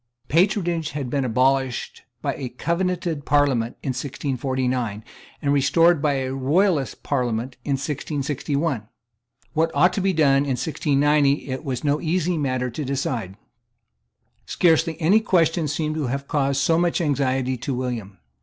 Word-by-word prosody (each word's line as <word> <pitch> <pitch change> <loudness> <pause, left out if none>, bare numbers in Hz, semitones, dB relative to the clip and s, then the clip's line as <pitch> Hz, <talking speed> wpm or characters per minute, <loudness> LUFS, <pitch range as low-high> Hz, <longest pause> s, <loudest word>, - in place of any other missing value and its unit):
Patronage 170 -2 +1
had 140 -4 -4
been 140 -2 0
abolished 130 +1 0 0.2
by - - 0
a 130 -3 -5
Covenanted 170 +2 -2
Parliament 135 -5 +1
in - - -2
1649, 130 -4 -2 0.4
and 140 -1 +2
restored 150 +4 +4
by 150 -2 +2
a 130 -1 -2
Royalist 145 +3 +1
Parliament 125 -2 -1
in 140 - -1
1661. 140 -2 -2 0.7
What 165 +1 +2
ought 175 +6 +4
to 195 - -1
be 190 +1 +2
done 150 -5 +4
in 140 -2 0
1690 145 +1 +1
it 130 +4 -4
was 130 -4 -3
no 145 +1 +1
easy 175 +1 0
matter 130 -4 -1
to 150 +6 -4
decide. 125 -8 -3 1.1
Scarcely 165 -1 +2
any 180 +7 +4
question 170 -7 +2
seems 155 +1 -1
to 150 -4 -1
have 140 +3 -3
caused 140 -2 +1
so 165 +3 +3
much 175 +1 +1
anxiety 135 -4 0
to 125 +4 -4
William. 120 -6 -4
140 Hz, 145 wpm, -23 LUFS, 130-160 Hz, 1.1 s, restored